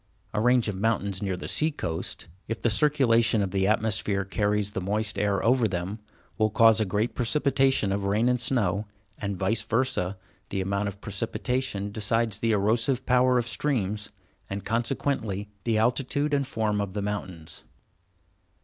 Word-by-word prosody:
A 105 Hz, -, 0 dB
range 125 Hz, 0 st, +3 dB
of 105 Hz, -, -1 dB
mountains 100 Hz, -2 st, -1 dB
near 95 Hz, -3 st, -2 dB
the -, -, -6 dB
sea 155 Hz, -, +2 dB
coast, 85 Hz, -, -5 dB, 0.2 s
if 115 Hz, 0 st, -3 dB
the 120 Hz, -, +1 dB
circulation 115 Hz, -5 st, +3 dB
of 95 Hz, -, -3 dB
the 95 Hz, -1 st, +1 dB
atmosphere 105 Hz, -2 st, +1 dB
carries 105 Hz, +1 st, 0 dB
the 95 Hz, -, -3 dB
moist 105 Hz, +3 st, -1 dB
air 100 Hz, 0 st, 0 dB
over 120 Hz, -1 st, +4 dB
them, 95 Hz, +3 st, -4 dB, 0.4 s
will 110 Hz, 0 st, +3 dB
cause 115 Hz, +1 st, +5 dB
a -, -, +2 dB
great 105 Hz, +4 st, -1 dB
precipitation 135 Hz, -3 st, +2 dB
of 100 Hz, 0 st, -1 dB
rain 105 Hz, +4 st, +2 dB
and 125 Hz, -1 st, +2 dB
snow, 105 Hz, -5 st, 0 dB, 0.3 s
and, 100 Hz, -2 st, -3 dB
vice 100 Hz, +5 st, 0 dB
versa, 115 Hz, -5 st, -1 dB, 0.3 s
the 100 Hz, -, -2 dB
amount 100 Hz, +2 st, -1 dB
of 100 Hz, 0 st, -7 dB
precipitation 125 Hz, -6 st, -2 dB
decides 110 Hz, 0 st, 0 dB
the 115 Hz, -, +1 dB
erosive 115 Hz, +5 st, +1 dB
power 125 Hz, 0 st, +4 dB
of 120 Hz, -, +1 dB
streams, 105 Hz, -7 st, -1 dB, 0.4 s
and 100 Hz, 0 st, -5 dB
consequently, 115 Hz, -3 st, -2 dB
the 115 Hz, -2 st, +2 dB
altitude 135 Hz, +6 st, +1 dB
and 140 Hz, -2 st, +1 dB
form 110 Hz, -5 st, 0 dB
of 100 Hz, -2 st, -4 dB
the 105 Hz, -1 st, -2 dB
mountains. 95 Hz, -6 st, -5 dB
110 Hz, 165 wpm, -26 LUFS, 100-120 Hz, 0.4 s, cause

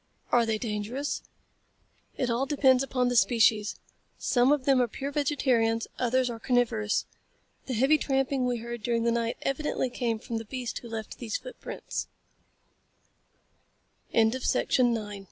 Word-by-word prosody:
"Are 235 Hz, -2 st, +4 dB
they 220 Hz, -1 st, +1 dB
dangerous?" 225 Hz, +6 st, -3 dB, 1.0 s
"It 250 Hz, -2 st, 0 dB
all 250 Hz, +4 st, 0 dB
depends 265 Hz, -3 st, +4 dB
upon 255 Hz, -2 st, 0 dB
the 245 Hz, -, -1 dB
species. 220 Hz, -3 st, +3 dB, 0.4 s
Some 250 Hz, +1 st, +3 dB
of 290 Hz, -3 st, +1 dB
them 270 Hz, -2 st, +4 dB
are 245 Hz, -, +2 dB
pure 275 Hz, +5 st, -5 dB
vegetarians; 255 Hz, -6 st, +1 dB
others 255 Hz, +1 st, +2 dB
are 235 Hz, -2 st, -5 dB
carnivorous. 230 Hz, -4 st, +1 dB, 0.6 s
The 255 Hz, -, -2 dB
heavy 270 Hz, +7 st, +4 dB
tramping 270 Hz, -2 st, 0 dB
we 245 Hz, -1 st, 0 dB
heard 235 Hz, 0 st, -6 dB
during 230 Hz, +1 st, 0 dB
the 235 Hz, -, +2 dB
night 230 Hz, 0 st, -1 dB
evidently 275 Hz, -2 st, -1 dB
came 235 Hz, -2 st, -1 dB
from 225 Hz, +1 st, -4 dB
the 225 Hz, -, -8 dB
beast 250 Hz, +1 st, -4 dB
who 235 Hz, -, -11 dB
left 220 Hz, -1 st, -6 dB
t -, -, -7 dB
245 Hz, 135 wpm, -28 LUFS, 230-265 Hz, 1.0 s, Are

